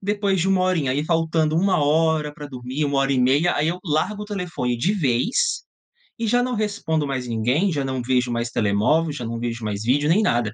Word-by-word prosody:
Depois 200 -1 0
de 180 - +1
1 190 -1 +2
horinha, 165 -8 +1
aí 145 +3 -1
faltando 160 -1 +1
1 185 -3 +2
hora 155 0 +1
para 145 0 -9
dormir, 130 +2 -4
1 140 -1 0
hora 135 0 +1
e 130 - +1
meia, 140 +7 +3
aí 145 - +1
eu 175 +3 -2
largo 180 +6 -1
o - - -5
telefone 180 - -3
de 180 - +1
vez 185 - 0 0.6
e 230 - 0
já 245 +3 +2
não 255 0 -2
respondo 200 -8 -1
mais 130 -2 -3
ninguém, 125 - +1
já 145 -4 -1
não 130 -1 -2
vejo 125 0 0
mais 115 0 -2
telemóvel, 115 +11 +1
já 130 - -6
não 115 0 -4
vejo 115 -1 -4
mais 105 -1 -3
vídeo, 145 +5 +2
nem 185 +7 +4
nada. 120 - 0
150 Hz, 220 wpm, -22 LUFS, 125-180 Hz, 0.6 s, nem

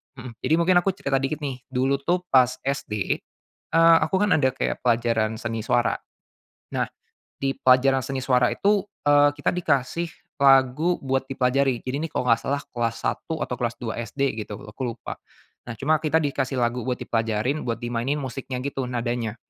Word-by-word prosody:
mhm, 125 -2 -8
jadi 155 - 0
mungkin 175 +1 +4
aku 190 +1 -1
cerita 135 -6 0
dikit 150 +3 -3
nih, 130 -3 -3
dulu 135 +1 0
tuh 175 +4 0
pas 130 -2 +6 0.2
SD, 105 -7 -1 0.5
eee, 165 0 +7
aku 190 - 0
kan 210 -2 +3
ada 130 -3 +3
kayak - - -3
pelajaran 115 -2 +1
seni 115 -2 -3
suara. 120 0 +2 0.8
Nah, - - 0 0.5
di 135 0 0
pelajaran 130 +1 +4
seni 135 +1 -4
suara 125 -2 +3
itu, 205 -1 +2 0.2
eee, 145 0 +6
kita - - 0
dikasih 165 0 0 0.3
lagu 135 +5 +4
buat 135 0 -1
dipelajari. 130 -1 +1
Jadi, 130 +2 -2
ini 165 - -2
kalau 125 - -2
nggak 115 0 +4
salah 140 +1 0
kelas 115 -1 -1
1 160 -1 -2
atau 125 - -4
kelas 120 -1 -1
2 115 0 -4
SD 135 +2 -1
gitu, 105 -1 -6
aku 105 +5 -8
lupa. - - -6 0.5
Nah, 120 - -4
cuma 155 +2 +1
kita 160 0 +1
dikasih 135 -3 -1
lagu 120 0 0
buat 125 0 -1
dipelajarin 115 +5 -1
buat 115 -1 -2
dimainin 120 +4 -2
musiknya 130 -1 -5
gitu, 135 -2 -2
nadanya. 120 -2 -2
130 Hz, 175 wpm, -24 LUFS, 120-145 Hz, 0.8 s, eee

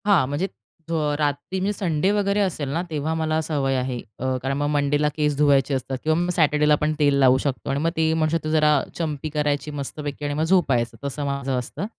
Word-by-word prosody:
हां, 195 -9 +4
म्हणजे 145 +7 -1 0.4
अ, - - -2 0.2
रात्री 145 +5 -1
म्हणजे 200 +3 0
संडे 180 -3 0
वगैरे 205 0 +1
असेल 160 -8 -1
ना, 160 +5 -1
तेव्हा 155 0 -2
मला 160 -1 0
सवय 140 -4 -1
आहे 125 -1 -2 0.2
अ, 130 0 -1
कारण 135 +1 -1
मग 145 0 0
मंडेला 145 0 +1
केस 150 -1 +1
धुवायचे 140 -1 +3
असतात 130 0 -2
किंवा 155 0 +2
मग 175 +1 0
सॅटर्डेला 150 -1 +4
पण 150 +1 0
तेल 145 -1 +4
लावू 130 -1 +6
शकतो 135 0 -3
आणि 135 +1 0
मग 165 +3 +1
ते 160 0 +2
म्हणतो, 160 0 0
जरा 150 -1 +4 0.2
चंपी 155 -2 -3
करायची 150 0 -1
मस्तपैकी 145 +1 -5
आणि 145 - -1
मग 155 +2 0
झोपायचं, 150 -9 +2
तसं 145 +1 -3
माझं 140 -1 -2
असतं. 125 +9 -5
150 Hz, 205 wpm, -23 LUFS, 140-160 Hz, 0.4 s, लावू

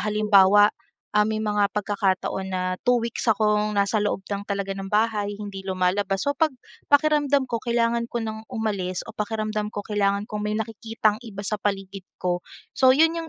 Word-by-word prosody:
halimbawa, 205 -1 +5 0.4
ah, 210 0 +4
may 220 - -1
mga 210 -1 +2
pagkakataon 195 -2 -1
na 185 -1 -2 0.3
2 245 - +6
weeks 235 0 -2
akong 210 -1 +2
nasa 200 +2 +2
loob 205 -2 -1
lang 200 - -2
talaga 200 -1 -2
ng 195 0 -6
bahay, 210 -1 0
hindi 200 -2 -7
lumalabas. 190 +1 0
So, 285 - +1
'pag 320 +2 +2 0.4
pakiramdam 290 -2 +3
ko, 235 -3 -3
kailangan 235 0 0
ko 235 -1 -3
nang 220 0 -6
umalis 205 -6 -2
o 225 - -10
pakiramdam 215 0 -2
ko, 205 -1 -6
kailangan 200 -1 0
kong 210 0 -5
may 210 0 -1
nakikitang 220 0 -1
iba 210 -4 -8
sa 210 +1 -2
paligid 195 -1 -3
ko, 180 -1 -1 0.3
so 260 - +4
'yon 320 +2 +5
'yong 330 -1 -5
210 Hz, 175 wpm, -24 LUFS, 200-225 Hz, 0.4 s, 2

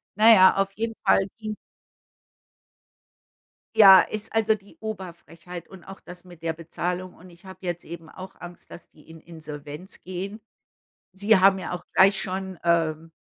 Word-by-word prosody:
Na 220 +3 +7
ja, 190 -3 +6
auf 195 0 0
jeden 225 +2 -3
Fall 195 - +3
ging 215 -1 -6 2.2
Ja, 195 -4 +9
ist, 215 +1 -6
also, 220 -1 +3
die 200 -1 -12
Oberfrechheit 175 -4 -9
und 190 -3 -14
auch 195 0 -11
das 180 +1 -12
mit 175 -3 -16
der 165 -1 -1
Bezahlung. 175 +3 -5
Und 180 +2 -16
ich 170 +2 -20
habe 190 0 -11
jetzt 175 -1 -4
eben 165 -1 -10
auch 185 +3 -11
Angst, 175 0 -12
dass - - -12
die 150 - -23
in 160 0 -12
Insolvenz 155 +1 -10
gehen. 190 +4 -6 0.7
Sie 200 +2 +3
haben 195 +1 +5
ja 185 - -6
auch 180 - -6
gleich 195 0 +5
schon, 190 -1 -5
ähm, 165 -1 0
185 Hz, 165 wpm, -24 LUFS, 170-195 Hz, 2.2 s, Ja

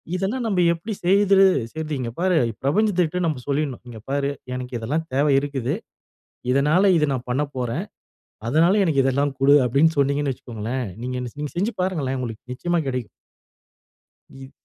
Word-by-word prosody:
இதெல்லாம் 210 +7 -2
நம்ப 195 -4 0
எப்பிடி 170 +7 -5
செய்துரு 195 +1 +5 0.3
செய்றது? 155 -1 -4
இங்க 120 -2 -3
பாரு 185 0 +2 0.3
பிரபஞ்சத்துகிட்ட 180 +1 +1
நம்ம 150 -6 -1
சொல்லிடணும். 140 -3 -2
"இங்கே 110 -2 -10
பாரு, 140 0 0 0.3
எனக்கு 125 0 -6
இதெல்லாம் 150 +9 -2
தேவை 145 +2 +3
இருக்குது. 135 -3 -2 0.8
இதனால 155 +9 +4
இத 150 -1 +2
நான் 125 -2 -4
பண்ணப்போறேன். 130 -3 -2 0.6
அதனால 170 - +4
எனக்கு 150 -6 +2
இதெல்லாம் 140 +1 +1
குடு 140 +1 +6
அப்படீன்னு 145 +6 +3
சொன்னீங்கன்னு 140 0 +1
வைச்சுக்கோங்களேன். 120 +1 -5 0.2
நீங்க 125 0 -3
நீங் 120 - -10
நீங்க 150 -1 -4
செஞ்சு 205 +7 0
பாருங்களேன். 155 -8 -1
உங்களுக்கு 120 0 -7
நிச்சயமா 175 +6 -1
கிடைக்கும். 125 -3 -3 1.2
இ 135 0 -12
145 Hz, 145 wpm, -23 LUFS, 130-175 Hz, 1.2 s, குடு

